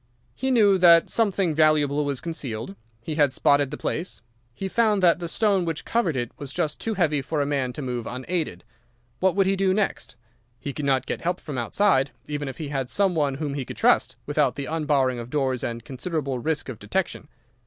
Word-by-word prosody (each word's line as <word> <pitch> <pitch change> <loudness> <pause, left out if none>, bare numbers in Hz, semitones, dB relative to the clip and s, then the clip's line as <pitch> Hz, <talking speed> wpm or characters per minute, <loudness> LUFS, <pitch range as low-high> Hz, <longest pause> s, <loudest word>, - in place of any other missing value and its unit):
He 265 - -2
knew 205 -6 +5
that 170 -2 +6
something 195 -6 +1
valuable 150 -2 +3
was 140 -3 -2
concealed. 120 - -5 0.3
He 155 - -4
had 145 -3 +3
spotted 140 0 +3
the - - -6
place. 165 - -4 0.3
He 190 +11 -5
found 210 -1 +2
that 170 -1 +5
the 170 - -4
stone 200 +1 +1
which 165 -1 -3
covered 195 - 0
it 120 -2 -2
was 140 -2 -5
just 150 +1 -2
too 225 -1 -1
heavy 155 -6 +1
for 150 +3 -3
a 145 - +1
man 140 -3 -1
to 145 - -6
move 125 -3 -3
unaided. 130 - -3 0.6
What 190 -1 +2
would 195 -1 +3
he 195 +1 +2
do 190 -1 +2
next? 200 - -2 0.4
He 140 - -5
could 150 - -4
not 135 -2 +2
get - - -4
help 175 +1 -1
from 140 -4 -5
outside, 135 - +2 0.2
even 145 -1 -3
if 130 - -6
he 155 -3 -5
had 135 -3 -2
some 195 -2 +2
one 145 -4 +1
whom 145 0 -3
he 140 -1 -3
could - - -9
trust, - - +3
without 145 -3 +1
the 140 - -4
unbarring 145 -6 +1
of 120 0 -7
doors 130 -3 -1
and 115 -1 -4
considerable 140 -1 -3
risk 155 +4 -2
of 130 -5 -7
detection. 155 - -2
150 Hz, 210 wpm, -25 LUFS, 135-180 Hz, 0.6 s, that